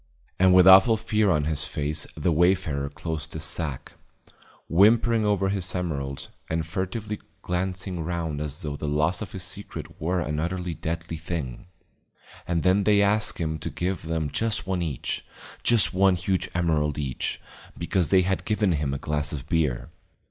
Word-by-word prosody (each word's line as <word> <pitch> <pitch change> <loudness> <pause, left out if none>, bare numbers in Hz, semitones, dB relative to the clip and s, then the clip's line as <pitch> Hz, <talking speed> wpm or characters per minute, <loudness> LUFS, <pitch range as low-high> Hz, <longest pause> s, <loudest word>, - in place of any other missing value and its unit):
And 95 0 +6
with 90 -1 +7
awful 95 +4 +8
fear 110 -1 +1
on 75 -5 +2
his 75 -1 0
face 75 +1 -2
the 80 +3 +1
wayfarer 80 -4 +2
closed 80 +2 -5
his - - -3
sack, 75 -7 -2 0.7
whimpering 110 +4 +4
over 100 -2 +2
his 95 -2 0
emeralds 70 -7 -3 0.2
and 80 0 -1
furtively 100 +5 -3 0.2
glancing 90 0 -2
round 80 -3 -3
as 75 +3 -5
though 75 -2 -3
the 75 - -5
loss 75 +6 +1
of 100 -5 -6
his 95 -2 -5
secret 95 +2 -8
were 90 +3 0
and 75 -2 -2
utterly 90 +1 -2
deadly 80 +1 -4
thing. 80 -4 -5 0.8
And 85 -2 0
then 95 +2 +3
they 105 0 +4
asked 105 +1 +2
him 80 -2 -2
to - - -4
give 90 0 -2
them 80 -2 -2
just 110 -3 0
one 95 -1 -1
each, 75 -7 -3 0.4
just 115 -5 +3
one 95 0 +4
huge 90 +1 -1
emerald 75 -4 +1
each, 70 -4 -3 0.4
because 90 -5 0
they 95 -1 +5
had 95 +1 -1
given 105 -3 +1
him 70 -3 -1
a - - -1
glass 75 0 -2
of 70 -2 -6
beer. 75 -7 0
85 Hz, 170 wpm, -26 LUFS, 75-95 Hz, 0.8 s, awful